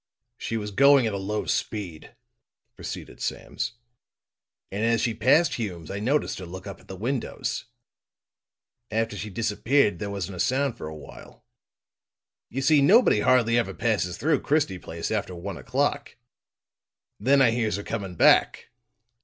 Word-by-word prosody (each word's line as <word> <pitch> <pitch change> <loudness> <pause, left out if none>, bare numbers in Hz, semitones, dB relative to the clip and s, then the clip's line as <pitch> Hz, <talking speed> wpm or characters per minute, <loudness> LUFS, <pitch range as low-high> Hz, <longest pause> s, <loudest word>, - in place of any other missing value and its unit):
"She 115 - -3
was 105 -1 -4
going 140 +3 +5
at 110 - -1
a - - -2
low 105 +2 -3
speed," 95 -8 -4 0.6
proceeded - - -8
Sams, - - -4 1.0
"and 100 +3 -2
as 115 0 +2
she 115 - 0
passed 135 +10 +3
Hume's 90 -8 -5
I 100 - -4
noticed 135 +4 0
her 90 - -8
look 90 +1 -9
up 100 - -8
at - - -21
the 95 - -7
windows. 120 +6 -3 1.2
After 110 0 -1
she 105 +1 -5
disappeared 110 0 +1
there 100 - -4
wasn't 100 -2 -5
a - - -9
sound 130 +5 +1
for 115 - -7
a 80 - -7
while. 75 - -13 1.0
You 135 +3 -3
see, 150 0 +5
nobody 200 - +5
hardly 120 0 +3
ever 120 - -2
passes 100 -7 0
through 150 -1 +1
Christie 145 -12 0
Place 85 -1 -5
after 100 -4 -2
one 95 +3 -6
o'clock. 140 +1 -2 1.0
Then 135 +7 +4
I 125 -4 +5
hears 115 -4 0
her 100 - -5
coming 100 -6 -5
back. - - +4
110 Hz, 155 wpm, -25 LUFS, 100-130 Hz, 1.2 s, going